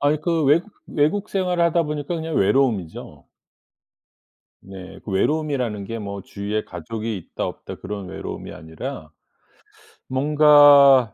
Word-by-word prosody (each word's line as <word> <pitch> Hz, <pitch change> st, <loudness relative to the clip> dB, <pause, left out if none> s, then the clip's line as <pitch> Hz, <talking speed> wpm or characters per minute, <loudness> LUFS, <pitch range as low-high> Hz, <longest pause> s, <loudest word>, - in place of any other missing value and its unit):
아니 145 Hz, +1 st, +1 dB
그 165 Hz, -1 st, 0 dB
외국 165 Hz, +9 st, +2 dB
외국 160 Hz, +8 st, 0 dB
생활을 180 Hz, -3 st, 0 dB
하다 170 Hz, 0 st, +2 dB
보니까 150 Hz, +2 st, -4 dB
그냥 160 Hz, -1 st, -4 dB
외로움이죠. 100 Hz, -6 st, 0 dB, 1.3 s
네. 95 Hz, -1 st, -11 dB
그 -, -, -7 dB
외로움이라는 125 Hz, -1 st, -1 dB
게 115 Hz, +2 st, -5 dB
뭐 100 Hz, -2 st, -6 dB
주위에 105 Hz, +3 st, -4 dB
가족이 110 Hz, +6 st, -5 dB
있다 90 Hz, -, -5 dB
없다 -, -, -8 dB
그런 100 Hz, -1 st, -7 dB
외로움이 -, -, -7 dB
아니라. 80 Hz, 0 st, -8 dB, 1.0 s
뭔가 145 Hz, -3 st, +6 dB
135 Hz, 285 characters per minute, -22 LUFS, 100-150 Hz, 1.3 s, 뭔가